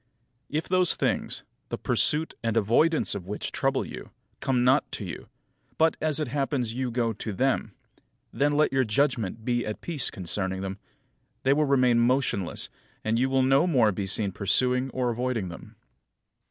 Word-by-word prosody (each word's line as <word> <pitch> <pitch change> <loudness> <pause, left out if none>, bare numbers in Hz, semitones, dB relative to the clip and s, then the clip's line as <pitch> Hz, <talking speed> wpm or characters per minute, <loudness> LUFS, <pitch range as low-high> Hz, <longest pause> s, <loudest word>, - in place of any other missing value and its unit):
11. 150 - -2
If 160 - -3
those 185 -1 +4
things, - - -1 0.3
the - - -3
pursuit 155 +2 +2
and 115 -1 -1
avoidance 120 +10 +3
of 95 -3 -6
which 105 +1 -4
trouble - - 0
you, - - -9 0.3
come 130 -3 +1
not 130 +3 +3
to 105 - -4
you; 90 - -8 0.5
but, 160 0 +3
as 155 -2 +1
it 150 -5 -2
happens, 135 -3 -1
you 130 +1 -2
go 115 -1 0
to 110 +1 -5
them; 110 -1 0 0.6
then 145 +1 +1
let 150 -1 +2
your 135 0 +3
judgment 115 -3 0
be 120 -1 0
at 105 - -5
peace 155 -7 +1
concerning 95 0 -2
them, 95 0 -5 0.6
they 135 - +4
will 150 +1 +2
remain 130 -4 +3
motionless, 120 -6 0 0.4
and 110 +1 0
you 130 +1 +2
will 135 0 +2
no 135 +6 +4
more 125 -10 +4
be 100 0 -3
seen 100 0 0
pursuing 125 +7 +2
or 125 -1 -1
avoiding 120 -5 -2
them. 85 - -11
125 Hz, 175 wpm, -26 LUFS, 110-140 Hz, 0.6 s, those